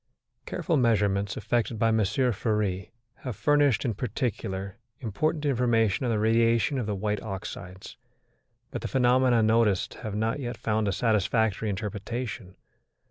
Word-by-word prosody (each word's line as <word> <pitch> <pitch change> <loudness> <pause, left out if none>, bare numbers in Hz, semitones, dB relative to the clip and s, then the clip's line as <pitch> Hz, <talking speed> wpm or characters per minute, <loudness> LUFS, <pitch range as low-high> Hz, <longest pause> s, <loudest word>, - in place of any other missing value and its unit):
Careful 165 -4 0
measurements 105 -4 +1
effected 115 -2 -1
by 115 +1 +2
M. 110 0 +2
Fery 105 -3 0 0.3
have 125 -5 -6
furnished, 145 +4 +3
in 115 - 0
particular, 100 -3 -3 0.2
important 150 +7 -1
information 120 -4 +2
on - - +1
the 110 - +1
radiation 115 +4 +2
of 115 - -3
the 105 - -1
white 105 +1 -2
oxides; 95 -2 -7 0.7
but - - -4
the - - -3
phenomena 125 -2 +3
noticed 110 -3 +2
have 110 -4 -4
not 110 +5 0
yet 120 -3 -4
found 110 -1 0
a - - +2
satisfactory 110 0 +1
interpretation. 105 0 -5
110 Hz, 135 wpm, -27 LUFS, 100-120 Hz, 0.7 s, furnished